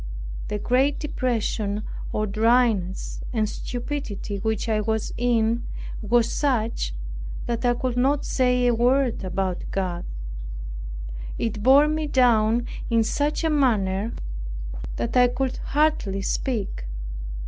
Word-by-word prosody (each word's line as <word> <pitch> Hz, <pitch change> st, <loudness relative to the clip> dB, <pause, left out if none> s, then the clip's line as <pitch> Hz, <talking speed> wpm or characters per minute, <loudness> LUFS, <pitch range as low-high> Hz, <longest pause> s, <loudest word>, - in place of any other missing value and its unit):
The 210 Hz, -, -2 dB
great 260 Hz, +6 st, +2 dB
depression, 220 Hz, -7 st, -1 dB, 0.3 s
or 215 Hz, -, 0 dB
dryness 215 Hz, -3 st, +2 dB
and 220 Hz, -3 st, +1 dB
stupidity 240 Hz, -4 st, -4 dB
which 220 Hz, +2 st, -1 dB
I 215 Hz, -1 st, +2 dB
was 220 Hz, 0 st, -1 dB
in, 235 Hz, -1 st, +1 dB, 0.3 s
was 235 Hz, +1 st, +2 dB
such 230 Hz, -, 0 dB, 0.5 s
that 235 Hz, 0 st, -2 dB
I 240 Hz, 0 st, +4 dB
could 250 Hz, 0 st, -2 dB
not 275 Hz, +3 st, +2 dB
say 250 Hz, -1 st, +2 dB
a 245 Hz, -, +4 dB
word 245 Hz, 0 st, +2 dB
about 185 Hz, -1 st, -1 dB
God. 180 Hz, -3 st, -2 dB, 1.3 s
It 220 Hz, -2 st, -2 dB
bore 270 Hz, +6 st, +7 dB
me 310 Hz, 0 st, 0 dB
down 240 Hz, -3 st, +4 dB, 0.2 s
in 230 Hz, -1 st, +4 dB
such 290 Hz, +8 st, 0 dB
a 320 Hz, -, +3 dB
manner 220 Hz, -7 st, +2 dB, 0.8 s
that 120 Hz, -, -2 dB
I 250 Hz, 0 st, +7 dB
could 260 Hz, +1 st, -1 dB
hardly 275 Hz, -10 st, +1 dB
speak. 205 Hz, -, -2 dB
235 Hz, 120 wpm, -25 LUFS, 210-255 Hz, 1.3 s, bore